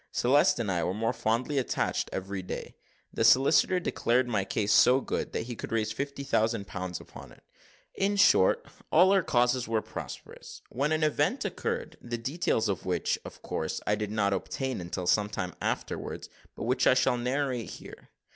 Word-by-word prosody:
Celeste 140 +5 +3
and 110 -5 -1
I 85 -2 0
were 90 - -1
more 115 +2 0
fondly 125 +6 0
attached 130 - -1
every 95 0 -4
day. 90 - -6 0.4
The - - 0
solicitor 140 +7 +5
declared 125 -7 +1
my 105 -5 0
case 100 +2 0
so 130 +2 +6
good, - - -3
that - - -1
he 120 +1 -6
could - - -7
raise 110 -1 0
fifty 140 +4 -4
thousand 110 -5 0
pounds 95 -2 -5
upon - - -12
it. - - -19 0.5
In 200 +1 0
short, 185 - +4 0.3
all 180 +4 +6
our 195 -1 +4
causes 125 -4 +1
were 115 -1 0
prosperous, - - -9
when 140 +4 -1
an 155 0 +1
event 155 - +1
occurred, - - -3
the 120 0 -4
details 120 -2 0
of 100 -3 -2
which, 90 -1 -1
of - - -11
course, - - -3
I 105 - +2
did 105 0 -2
not 100 -2 +1
obtain 130 +4 -3
until 90 +1 -4
some 105 +3 +2
time 95 -3 -4
afterwards, - - -3 0.3
but - - -6
which 125 +2 +1
I - - +6
shall 125 -1 +2
narrate 125 -1 -1
here. - - -11
120 Hz, 185 wpm, -29 LUFS, 105-135 Hz, 0.5 s, so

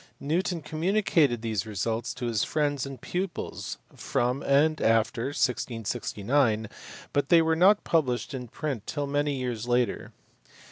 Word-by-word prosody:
Newton 170 +2 -1
communicated 155 - +1
these 110 -2 -2
results 110 +3 -2
to 125 - -4
his 115 -3 +1
friends 145 -3 0
and 135 -1 -8
pupils 185 0 -4 0.2
from 125 +3 -1
and 150 +3 +3
after 115 +1 +2
1669, 115 -2 0 0.5
but 145 -1 +1
they 170 - +7
were 160 0 +2
not 195 +5 +5
published 135 -6 0
in 125 -2 -5
print 130 -3 -4
till 145 -1 -2
many 145 0 0
years 120 -3 -3
later. 120 0 0
135 Hz, 135 wpm, -27 LUFS, 115-155 Hz, 0.5 s, they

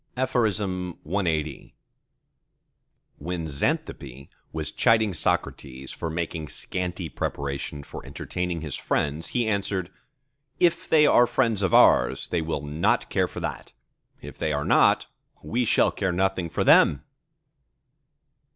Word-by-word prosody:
CLXXXI 90 - -1 1.5
When 85 +1 -4
Xanthippe 70 -2 -3 0.2
was 80 -2 -4
chiding 110 -3 +3
Socrates 65 -4 -2
for 80 - -5
making 80 -1 -4
scanty 90 +2 -4
preparation 70 0 -4
for - - -9
entertaining 85 +4 -4
his 75 -4 -4
friends, 75 +2 -1
he 120 -3 -1
answered:—"If 130 - -3
they 150 -1 +6
are 120 -4 +5
friends 115 -6 +1
of 95 -3 +2
ours - - +4
they 85 - 0
will 80 -3 -3
not 75 +3 0
care - - +2
for - - -8
that; - - -5 0.5
if - - -10
they 80 - 0
are 75 0 -1
not, - - +4 0.4
we 120 +2 -1
shall - - +3
care 95 -2 -1
nothing 95 -1 0
for - - -1
them!" 70 - +5
90 Hz, 120 wpm, -25 LUFS, 75-105 Hz, 1.5 s, they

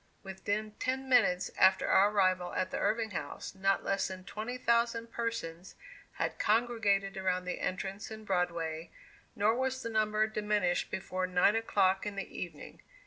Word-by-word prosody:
Within 205 +2 -3
ten 265 +1 -2
minutes 220 -8 +3
after 190 0 +5
our 200 +2 +5
arrival 185 -3 +1
at 185 0 -1
the - - -2
Irving 220 +1 0
House, 145 -6 -5
not 195 0 +1
less 195 0 0
than 185 -1 -7
twenty 220 +6 -5
thousand 235 -1 +1
persons 195 -7 -4 0.4
had - - -3
congregated 210 -4 +1
around 185 -1 0
the 180 - -3
entrance 195 +4 -3
in 220 0 -9
Broadway, 170 -3 -1 0.5
nor 210 +2 +3
was 260 +1 -1
the 230 - -4
number 215 0 +2
diminished 210 -4 0
before 185 -1 -3
nine 180 +3 +3
o'clock 195 -4 +2
in 205 - -4
the 195 - -6
evening. 170 -5 -7
200 Hz, 155 wpm, -32 LUFS, 185-220 Hz, 0.5 s, after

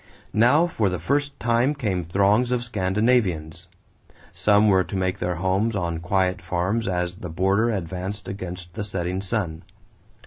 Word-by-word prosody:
Now 125 +10 +5
for 115 - 0
the 90 - -2
first 140 - -1
time 120 +5 +2
came 100 -10 -1
throngs 100 +8 +2
of 125 -1 0
Scandinavians. 95 -6 0 0.6
Some 105 0 +3
were 95 -2 +4
to 90 +3 -7
make 95 0 -1
their 90 0 -1
homes 95 +6 0
on 85 -4 -2
quiet 90 +1 0
farms 95 +6 -1
as 90 -1 -1
the 90 - -7
border 95 +7 +1
advanced 95 0 -4
against 90 -2 -7
the 105 - -4
setting 95 -2 -3
sun. 95 -5 -2
95 Hz, 150 wpm, -24 LUFS, 90-110 Hz, 0.6 s, Now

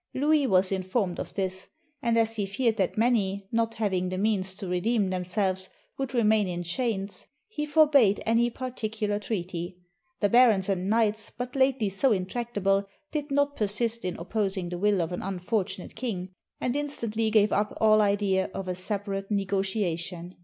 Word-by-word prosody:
Louis 295 +1 +3
was 185 -2 +3
informed 185 0 -1
of - - -6
this; 190 -1 -2 0.3
and 235 -3 +1
as 225 0 +2
he 205 -3 -1
feared 225 +3 0
that 190 0 0
many, 200 -4 +1
not 230 0 0
having 190 -4 0
the 185 - -3
means 190 -2 0
to 190 - -6
redeem 190 +3 +1
themselves, 185 +1 -1 0.3
would 270 -1 -3
remain 215 -3 +3
in 175 -1 -3
chains, 200 +1 -3 0.2
he 300 -9 -4
forbade 290 -9 +5
any 230 +1 +3
particular 220 -4 -3
treaty. 180 -3 -4 0.4
The 205 - +3
barons 220 -4 +5
and 190 0 0
knights, 220 -1 +1
but 245 +1 -6
lately 260 -6 +2
so 245 +7 +2
intractable, 200 -1 0 0.2
did 300 -1 -3
not 285 +1 +1
persist 225 +2 0
in 180 -1 -3
opposing 190 0 -2
the 175 0 -5
will 200 -2 +2
of 165 - -4
an 175 - -3
unfortunate 190 0 -3
king, 210 -6 -3 0.3
and 250 +1 -1
instantly 230 -7 -1
gave 215 -1 +4
up 205 +1 +1
all 215 -1 +5
idea 200 -2 +1
of 195 - -4
a 180 - -1
separate 195 +1 -2
negotiation. 190 -3 -2
205 Hz, 165 wpm, -27 LUFS, 190-230 Hz, 0.4 s, forbade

